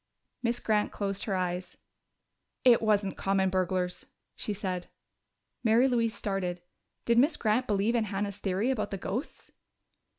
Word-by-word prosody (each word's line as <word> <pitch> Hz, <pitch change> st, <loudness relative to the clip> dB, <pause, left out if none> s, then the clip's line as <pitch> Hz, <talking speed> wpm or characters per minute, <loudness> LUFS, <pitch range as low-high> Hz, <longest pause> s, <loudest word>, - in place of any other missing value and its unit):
Miss 235 Hz, 0 st, 0 dB
Grant 210 Hz, -1 st, +1 dB
closed 200 Hz, -1 st, -3 dB
her 200 Hz, -, -1 dB
eyes. 180 Hz, 0 st, -3 dB, 0.9 s
"It 245 Hz, -2 st, +7 dB
wasn't 205 Hz, -3 st, +1 dB
common 195 Hz, -1 st, +1 dB
burglars," 185 Hz, -1 st, -1 dB, 0.3 s
she -, -, -3 dB
said. 185 Hz, -3 st, -3 dB, 0.7 s
Mary 235 Hz, +3 st, +5 dB
Louise 230 Hz, -3 st, +1 dB
started. 185 Hz, -3 st, -2 dB, 0.5 s
Did 235 Hz, 0 st, +4 dB
Miss 295 Hz, +4 st, +4 dB
Grant 225 Hz, +4 st, +1 dB
believe 205 Hz, +2 st, +2 dB
in 230 Hz, -2 st, +2 dB
Hannah's 200 Hz, 0 st, -3 dB
theory 200 Hz, +6 st, 0 dB
about 215 Hz, -5 st, -1 dB
the 195 Hz, -, -3 dB
ghosts? 210 Hz, -, -5 dB
205 Hz, 140 wpm, -29 LUFS, 190-230 Hz, 0.9 s, It